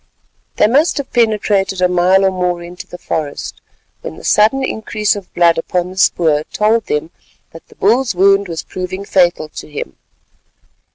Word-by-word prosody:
They - - +3
must 280 +10 +2
have 280 -2 -5
penetrated 210 -5 +1
a 180 - +3
mile 180 +2 +3
or 190 - +3
more 180 -2 -2
into 175 +1 -10
the 180 - -10
forest 150 -4 -5 0.4
when 80 - -8
the - - -13
sudden 225 +6 +3
increase 215 -3 -1
of 200 -3 -9
blood 170 -1 +3
upon 180 +2 -2
the 190 - -12
spoor 155 -5 +2
told 220 +1 +1
them 150 +3 -2 0.4
that 165 - -14
the - - -20
bull's 235 +2 +1
wound 195 +2 +3
was 165 -2 -5
proving 185 +2 -6
fatal 175 -5 +2
to - - -10
him. 145 - -7
185 Hz, 170 wpm, -16 LUFS, 175-210 Hz, 0.4 s, They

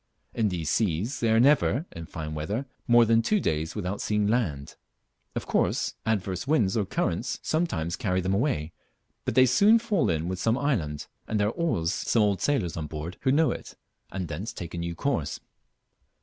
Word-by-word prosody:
In 110 -3 +1
these 85 -4 -2
seas 105 - 0
they 115 - +1
are 110 0 +4
never 140 +2 +4
(in 85 -1 -8
fine 75 -1 -6
weather) 100 - -3 0.2
more 120 0 +6
than 115 +1 +4
two 210 - +2
days 80 - -1
without 100 -1 -3
seeing 105 -1 +1
land. 100 - -1 0.6
Of - - -3
course - - 0
adverse 100 -1 -1
winds 115 -11 +2
or 105 -4 0
currents - - -1
sometimes 90 - -1
carry 95 -7 0
them 95 +1 0
away, 95 - 0 0.5
but - - -2
they 130 0 +7
soon 200 - +5
fall 220 -6 +1
in 80 0 0
with 95 0 -3
some 115 +5 +2
island, 90 - -1 0.2
and 110 - -1
there 105 0 +2
are - - -2
always 115 - 0
some 115 - +1
old 100 -3 +1
sailors 115 - 0
on 80 -2 -3
board 80 +4 -6
who 130 - +2
know 150 -1 +3
it, - - -7 0.4
and 95 -2 -4
thence 85 +9 -5
take 85 -1 -7
a 85 - -4
new 85 0 -3
course. - - -1
105 Hz, 190 wpm, -27 LUFS, 85-125 Hz, 0.6 s, they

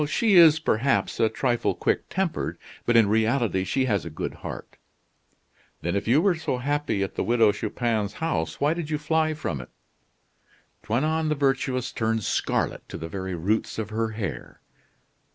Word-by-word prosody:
"She 220 +5 +2
is, 165 -4 +8
perhaps, 135 -4 0
a 110 - +4
trifle 120 +2 0
quick - - -1
tempered; 190 -3 -2 0.3
but 120 -1 +4
in 110 -3 +6
reality 110 -2 +1
she 130 +8 0
has 105 -6 0
a 85 - -6
good 75 - -4
heart." - - -8 1.1
"Then, 85 +3 -1
if 100 - -2
you 140 +8 +4
were 200 -2 +4
so 160 -6 -2
happy 135 -6 -1
at 95 - -4
the - - -2
Widow 115 -2 +4
Chupin's 110 -1 -2
house, 80 - -2
why 145 +2 +2
did 165 -3 -5
you 155 - 0
fly 155 +1 0
from 75 - -3
it?" - - -12 1.1
Toinon 155 +8 0
the 150 - +1
Virtuous 135 -3 0
turned 110 -1 -1
scarlet - - -1
to - - -6
the 80 - -6
very 95 +1 -4
roots 100 +7 -1
of 110 -1 -4
her 115 +1 -1
hair. 105 -5 -5
120 Hz, 170 wpm, -25 LUFS, 105-150 Hz, 1.1 s, is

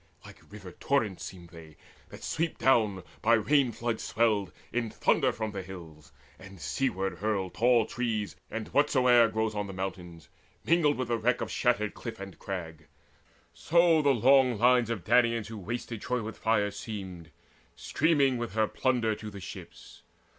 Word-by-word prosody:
Like - - -13
river 100 -3 -10
torrents 110 -1 -1
seemed 90 -3 -9
they, 80 -3 -14 0.3
that - - -12
sweep 165 0 -2
down, 110 -8 +2 0.2
By 115 - +3
rain, 130 +3 +2
floods 115 0 -3
swelled, 105 -5 +1 0.2
in 120 -2 -1
thunder - - +2
from 110 -1 -4
the 100 -2 -5
hills, 85 -5 -11 0.3
And 95 0 -13
seaward 95 - -2
hurl 100 -3 -1
tall 120 -1 +3
trees 110 -4 -3
and 115 -1 -5
whatsoe'er 125 -4 +4
Grows 110 0 -1
on 105 -1 -3
the 95 - -7
mountains, 90 -3 -6 0.4
mingled 160 -3 +3
with 130 -2 -3
the 115 -1 0
wreck 125 +3 +1
Of - - -4
shattered 105 -4 0
cliff 115 -2 -8
and 95 -2 -9
crag; 85 -5 -7 0.7
so 170 -1 +3
the 145 - +2
long 130 -1 +4
lines 120 +1 +4
Of 110 -7 -3
Danaans 115 +1 +2
who 110 - -7
had 95 - -13
wasted 115 -1 -4
Troy 125 -2 -2
with 110 +1 -7
fire 105 -2 +1
Seemed, 95 -5 -7 0.5
streaming 140 -5 +1
with 120 -4 -4
her 110 0 +2
plunder 120 -3 0
to 105 0 -7
the 100 -1 -9
ships. - - -11
110 Hz, 170 wpm, -29 LUFS, 95-125 Hz, 0.7 s, whatsoe'er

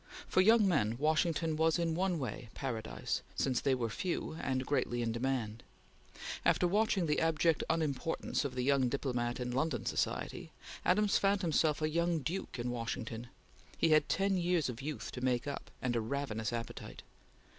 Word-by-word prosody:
For 185 - +4
young 220 +1 +6
men 115 - +2
Washington 160 +2 +1
was 160 +1 +3
in 170 -1 0
one 180 +1 +1
way 125 -4 -5
paradise, 115 -5 -3
since 130 -3 +1
they 135 -2 +2
were 120 -2 -1
few, 170 +9 -3
and 130 -1 -1
greatly 125 -4 0
in 115 - 0
demand. 115 -2 -2 0.8
After 180 - +3
watching 200 -1 +2
the 150 -2 +1
abject 165 0 +2
unimportance 160 -1 0
of 135 -3 -4
the 125 - -1
young 135 -1 +3
diplomat 120 -2 -1
in 125 0 -2
London 135 -1 -1
society, - - -2 0.3
Adams 205 +2 +3
found 200 0 +2
himself 155 -2 +2
a - - +3
young 170 +1 +1
duke 160 +5 -4
in 120 0 -2
Washington. 115 0 -4 0.5
He 165 - +3
had 155 -1 +4
ten 195 +1 +2
years 175 -4 +1
of 125 +1 -6
youth 150 +1 -5
to 125 - -6
make 125 0 +1
up, 140 -1 -5
and 125 -1 0
a 115 - +1
ravenous 115 -2 -2
appetite. 115 -1 -6
140 Hz, 170 wpm, -33 LUFS, 125-165 Hz, 0.8 s, young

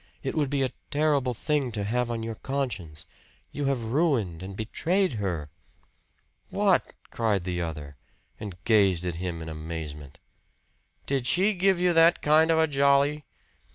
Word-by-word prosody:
It - - -2
would 150 -4 0
be 140 -1 0
a 130 - -1 0.2
terrible 145 -4 +1
thing 145 0 0
to 105 -2 -2
have 120 +4 -1
on 115 -1 -3
your 115 0 -4
conscience. 110 - -4 0.5
You 145 - -3
have 135 -4 0
ruined 115 - 0
and 95 +1 -7
betrayed 170 - 0
her." 80 -7 -3 1.0
"WHAT!" - - +1 0.2
cried 105 -5 0
the 90 -1 -2
other, 75 -4 -6 0.4
and 105 -4 -6
gazed 100 -6 +3
at 85 -2 -3
him 85 -2 -4
in - - -8
amazement. 75 -3 -7 0.9
"Did 135 -3 -1
she 195 - +3
give 190 -1 +2
you 180 -1 +3
that 165 +1 +5
kind 155 +2 +5
of 165 - +4
a 160 - +5
jolly?" 140 0 +2
120 Hz, 155 wpm, -27 LUFS, 90-150 Hz, 1.0 s, that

